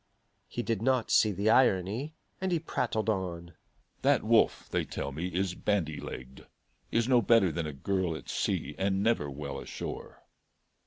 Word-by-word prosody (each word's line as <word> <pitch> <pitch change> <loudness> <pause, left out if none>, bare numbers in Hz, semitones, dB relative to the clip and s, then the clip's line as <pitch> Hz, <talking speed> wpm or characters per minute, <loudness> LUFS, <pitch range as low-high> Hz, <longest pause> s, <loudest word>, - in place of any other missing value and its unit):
He 120 - -4
did 115 -4 -1
not 130 -1 +1
see 110 - +5
the 100 +3 +2
irony, 120 - +2 0.3
and 190 -1 0
he 175 - +3
prattled 120 - -2
on: 90 -4 -2 0.5
"That - - +3
Wolfe, - - +3
they - - 0
tell 70 - -4
me, 80 +6 -3
is 90 0 -1
bandy 90 -7 -1
legged; 65 +1 -9 0.4
is 115 0 +2
no 125 -2 +5
better 110 -4 +4
than 80 0 -3
a - - -4
girl 90 +4 -1
at 75 - -9
sea, 75 - -1
and 95 0 +1
never 110 -10 +1
well 70 0 -5
ashore. - - -7
95 Hz, 165 wpm, -30 LUFS, 85-115 Hz, 0.5 s, see